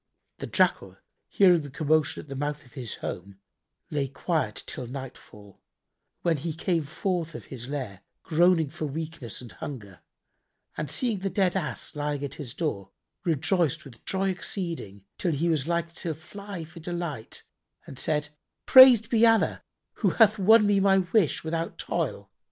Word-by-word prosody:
The -, -, -5 dB
Jackal, -, -, +1 dB, 0.3 s
hearing 180 Hz, -4 st, +5 dB
the 145 Hz, -, -8 dB
commotion 155 Hz, +2 st, +1 dB
at -, -, -19 dB
the 135 Hz, -, -6 dB
mouth 145 Hz, +1 st, -3 dB
of 125 Hz, -, -20 dB
his 125 Hz, -6 st, -5 dB
home, 95 Hz, +2 st, -6 dB, 0.5 s
lay 145 Hz, -2 st, 0 dB
quiet 135 Hz, -, -2 dB
till 125 Hz, -, -5 dB
nightfall, 120 Hz, -6 st, -10 dB, 0.6 s
when 170 Hz, -3 st, +2 dB
he 160 Hz, +3 st, -4 dB
came 165 Hz, -2 st, 0 dB
forth 165 Hz, +1 st, -2 dB
of -, -, -8 dB
his 125 Hz, 0 st, -7 dB
lair, 125 Hz, -10 st, -5 dB, 0.2 s
groaning 170 Hz, -1 st, +3 dB
for 155 Hz, 0 st, -4 dB
weakness 155 Hz, -5 st, -6 dB
and 120 Hz, -3 st, -10 dB
hunger, 100 Hz, -1 st, -8 dB, 0.8 s
and 150 Hz, -2 st, -4 dB
seeing 230 Hz, -, 0 dB
the 195 Hz, +1 st, -2 dB
dead 185 Hz, -1 st, +1 dB
Ass 165 Hz, -5 st, -3 dB
lying 145 Hz, -1 st, -2 dB
at 140 Hz, -, -6 dB
his 130 Hz, -5 st, -5 dB
door, 100 Hz, -, -3 dB, 0.3 s
rejoiced 165 Hz, -1 st, +1 dB
with 120 Hz, -5 st, -14 dB
joy 195 Hz, 0 st, 0 dB
exceeding 170 Hz, -, -5 dB
till 175 Hz, -4 st, 0 dB
he 160 Hz, +4 st, 0 dB
was 155 Hz, -3 st, 0 dB
like 170 Hz, -1 st, -1 dB
to 165 Hz, -1 st, -4 dB
fly 200 Hz, +3 st, -8 dB
for 165 Hz, +2 st, -12 dB
delight 170 Hz, -8 st, -5 dB, 0.4 s
and 135 Hz, -, -9 dB
said, 150 Hz, -1 st, 0 dB, 0.4 s
"Praised 255 Hz, -5 st, +9 dB
be 230 Hz, 0 st, +2 dB
Allah 225 Hz, -1 st, +4 dB, 0.4 s
who -, -, +4 dB
hath 220 Hz, -2 st, +5 dB
won 215 Hz, +3 st, +6 dB
me 205 Hz, -1 st, +3 dB
my 195 Hz, 0 st, +4 dB
wish 185 Hz, -2 st, +1 dB
without 165 Hz, +1 st, -3 dB
toil! -, -, -3 dB
160 Hz, 165 wpm, -27 LUFS, 135-180 Hz, 0.8 s, Praised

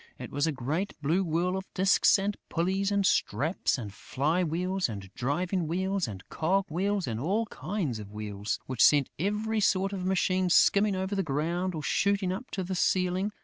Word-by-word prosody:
It -, -, -8 dB
was 145 Hz, +3 st, 0 dB
a -, -, +1 dB
great 150 Hz, +9 st, -3 dB
blue 170 Hz, +7 st, +2 dB
whirl 175 Hz, +2 st, 0 dB
of 190 Hz, 0 st, -6 dB
disks 190 Hz, +2 st, +4 dB
and 200 Hz, +1 st, -1 dB
pulleys 190 Hz, +4 st, 0 dB
and 200 Hz, -1 st, +2 dB
straps 160 Hz, -3 st, +1 dB
and 105 Hz, -6 st, -6 dB
fly 150 Hz, +11 st, -1 dB
wheels 180 Hz, +1 st, -1 dB
and 100 Hz, -3 st, -8 dB
driving 170 Hz, +7 st, -1 dB
wheels 190 Hz, +1 st, -1 dB
and 95 Hz, -3 st, -8 dB
cog 190 Hz, +4 st, 0 dB
wheels 195 Hz, +4 st, 0 dB
and 115 Hz, -3 st, -3 dB
all 200 Hz, -, 0 dB
kinds 180 Hz, -, -3 dB
of 105 Hz, -2 st, -8 dB
wheels, 105 Hz, -1 st, -4 dB
which 130 Hz, -3 st, +1 dB
sent 145 Hz, -3 st, +5 dB
every 210 Hz, +4 st, 0 dB
sort 195 Hz, -1 st, +2 dB
of 190 Hz, -2 st, -4 dB
machine 185 Hz, 0 st, +1 dB
skimming 200 Hz, +3 st, +4 dB
over 190 Hz, +2 st, -2 dB
the 195 Hz, -, +1 dB
ground 170 Hz, +4 st, -1 dB
or 155 Hz, -, -5 dB
shooting 200 Hz, 0 st, +1 dB
up 215 Hz, +8 st, -5 dB
to 190 Hz, -, -3 dB
the 185 Hz, +1 st, -4 dB
ceiling. 185 Hz, +2 st, +1 dB
180 Hz, 190 wpm, -28 LUFS, 150-195 Hz, -, sent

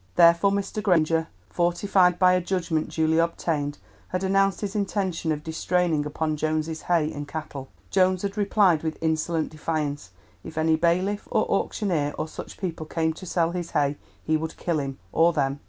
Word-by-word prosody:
Therefore 170 Hz, +3 st, +6 dB
Mr. 200 Hz, +1 st, -2 dB
Granger, 165 Hz, -5 st, +2 dB, 0.2 s
fortified 180 Hz, +1 st, +2 dB
by 180 Hz, 0 st, +5 dB
a 180 Hz, -, +2 dB
judgment 170 Hz, -3 st, -1 dB
duly 160 Hz, 0 st, +1 dB
obtained, 155 Hz, -3 st, -1 dB, 0.3 s
had 185 Hz, +1 st, -3 dB
announced 195 Hz, 0 st, +2 dB
his 205 Hz, 0 st, -4 dB
intention 190 Hz, -5 st, -1 dB
of 150 Hz, -1 st, -3 dB
distraining 160 Hz, -1 st, 0 dB
upon 155 Hz, +1 st, -2 dB
Jones's 155 Hz, +1 st, -1 dB
hay 165 Hz, -3 st, +1 dB
and 145 Hz, 0 st, -6 dB
cattle. 145 Hz, -4 st, -6 dB, 0.2 s
Jones 185 Hz, -1 st, +3 dB
had 200 Hz, 0 st, -2 dB
replied 200 Hz, -5 st, +3 dB
with 160 Hz, -1 st, -3 dB
insolent 160 Hz, 0 st, 0 dB
defiance. 150 Hz, -, -3 dB, 0.3 s
If 160 Hz, -, -10 dB
any 160 Hz, 0 st, +3 dB
bailiff, 180 Hz, +5 st, 0 dB
or -, -, +2 dB
auctioneer, 160 Hz, -9 st, 0 dB
or -, -, -2 dB
such -, -, -9 dB
people 165 Hz, -4 st, -4 dB
came 160 Hz, 0 st, 0 dB
to 185 Hz, +3 st, -10 dB
sell 170 Hz, -1 st, +1 dB
his 175 Hz, -1 st, -4 dB
hay 145 Hz, 0 st, +2 dB, 0.3 s
he 155 Hz, 0 st, +2 dB
would 160 Hz, +1 st, -5 dB
kill 170 Hz, -3 st, -1 dB
him, 135 Hz, -1 st, -4 dB
or 170 Hz, +1 st, +4 dB
them. 140 Hz, -2 st, 0 dB
165 Hz, 170 wpm, -25 LUFS, 155-185 Hz, 0.3 s, Therefore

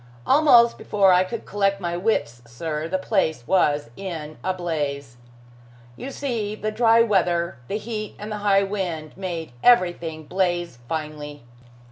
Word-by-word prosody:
Almost 255 Hz, -5 st, +5 dB
before 195 Hz, -3 st, +3 dB
I 180 Hz, +1 st, +5 dB
could 220 Hz, +5 st, -6 dB
collect 195 Hz, 0 st, 0 dB
my 175 Hz, -2 st, -3 dB
wits, 175 Hz, -, -1 dB
sir, 150 Hz, +6 st, -4 dB
the 190 Hz, +3 st, 0 dB
place 160 Hz, -8 st, 0 dB
was 145 Hz, -9 st, +2 dB
in 160 Hz, -6 st, -7 dB
a 185 Hz, -, +1 dB
blaze. 145 Hz, -8 st, -3 dB, 0.8 s
You 260 Hz, -, -7 dB
see 235 Hz, -7 st, -3 dB
the 215 Hz, 0 st, -3 dB
dry 230 Hz, +1 st, +4 dB
weather, 175 Hz, -, +1 dB
the 205 Hz, -, -2 dB
heat 215 Hz, -1 st, -5 dB
and 210 Hz, +1 st, -7 dB
the 210 Hz, -, -3 dB
high 200 Hz, -1 st, +3 dB
wind, 180 Hz, -6 st, -4 dB
made 175 Hz, -6 st, -5 dB
everything 175 Hz, -8 st, +3 dB
blaze 175 Hz, -5 st, -1 dB
finely. 150 Hz, -3 st, -5 dB
180 Hz, 145 wpm, -23 LUFS, 155-210 Hz, 0.8 s, Almost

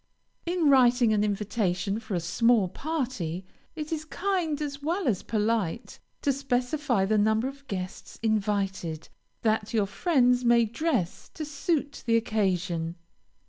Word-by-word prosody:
In 345 Hz, -2 st, +2 dB
writing 245 Hz, -4 st, +5 dB
an 210 Hz, -1 st, +2 dB
invitation 200 Hz, -1 st, -1 dB
for 220 Hz, -3 st, -4 dB
a -, -, +1 dB
small 215 Hz, +5 st, +3 dB
party, 225 Hz, -, -3 dB, 0.3 s
it 305 Hz, 0 st, -5 dB
is 310 Hz, -1 st, -3 dB
kind, 345 Hz, -2 st, -1 dB
as 285 Hz, -2 st, -4 dB
well 335 Hz, +3 st, -1 dB
as 205 Hz, -7 st, +1 dB
polite, 220 Hz, -1 st, -1 dB, 0.2 s
to 280 Hz, -, +3 dB
specify 255 Hz, -3 st, 0 dB
the 215 Hz, +2 st, +2 dB
number 220 Hz, +3 st, +2 dB
of 275 Hz, +1 st, -9 dB
guests 185 Hz, -3 st, -6 dB
invited, 195 Hz, -7 st, -1 dB, 0.3 s
that 220 Hz, 0 st, +1 dB
your 210 Hz, -2 st, +3 dB
friends 250 Hz, -, +2 dB
may 235 Hz, -1 st, +5 dB
dress 235 Hz, -, -2 dB
to 310 Hz, -, -4 dB
suit 290 Hz, 0 st, -2 dB
the 230 Hz, 0 st, +5 dB
occasion. 185 Hz, -7 st, -1 dB
230 Hz, 140 wpm, -27 LUFS, 200-280 Hz, 0.3 s, writing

